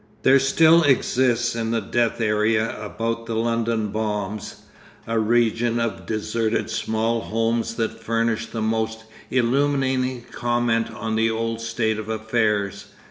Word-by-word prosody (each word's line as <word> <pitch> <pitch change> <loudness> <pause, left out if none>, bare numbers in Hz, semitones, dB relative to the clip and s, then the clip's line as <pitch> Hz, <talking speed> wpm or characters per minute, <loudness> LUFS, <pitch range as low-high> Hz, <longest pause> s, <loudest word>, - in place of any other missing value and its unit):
There 130 - +5
exists 135 -4 +4
still 115 - -3
in 115 - -2
the 115 0 +1
death 115 +3 0
area 110 +1 +1
about 115 +2 -3
the 115 - -3
London 115 -1 0
bombs, 105 -1 -4 0.4
a 115 0 0
region 115 +1 +2
of 115 -1 -3
deserted 110 +1 -1
small 115 +1 0
homes 115 +1 -1
that 115 -1 -3
furnish 115 0 0
the 115 -1 -4
most 110 0 -1 0.3
illuminating 130 -1 +1
comment 120 -1 0
on 110 -1 -4
the 110 +1 +2
old 115 0 -2
state 115 -1 -1
of 110 0 -7
affairs. 105 -3 -1
115 Hz, 135 wpm, -23 LUFS, 110-120 Hz, 0.4 s, There